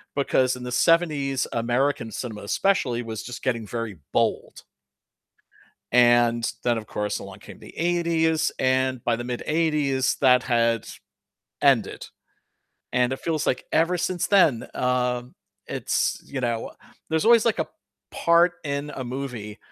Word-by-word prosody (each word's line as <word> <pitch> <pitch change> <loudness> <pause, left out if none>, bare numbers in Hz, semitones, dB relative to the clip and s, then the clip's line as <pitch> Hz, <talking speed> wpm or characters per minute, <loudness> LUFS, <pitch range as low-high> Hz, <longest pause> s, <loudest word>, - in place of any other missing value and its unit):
Because 130 -2 +2
in 125 - -9
the 125 - -5
'70s, 145 -2 +2
American 120 +1 0
cinema 110 -4 -6
especially, 120 - +1
was 110 -2 -6
just 125 +1 -8
getting 115 -4 -1
very 115 -3 -5
bold. - - -1 1.3
And 120 -1 +4
then 120 -2 +2
of 110 - -8
course, 105 0 -3
along - - -10
came - - -12
the - - -14
'80s, 165 -2 +1
and 130 -1 +1
by 120 -1 +1
the 120 - -6
mid 125 -1 -4
'80s 150 -5 +1
that 125 -2 +5
had 115 -2 +1 0.7
ended. - - +2 0.9
And 125 0 +2
it 130 - -4
feels 160 -2 -2
like - - 0
ever 165 +3 +2
since 175 0 -1
then, 165 - +3
um, 125 0 -1 0.3
it's, - - -1
you 135 -2 -5
know 120 -2 -2 0.4
there's 160 +2 0
always 230 -1 +6
like 230 - +1
a - - -2 0.4
part 170 +1 +3
in 140 +1 -3
a 130 - -5
movie 120 -5 -6
130 Hz, 145 wpm, -24 LUFS, 120-155 Hz, 1.3 s, always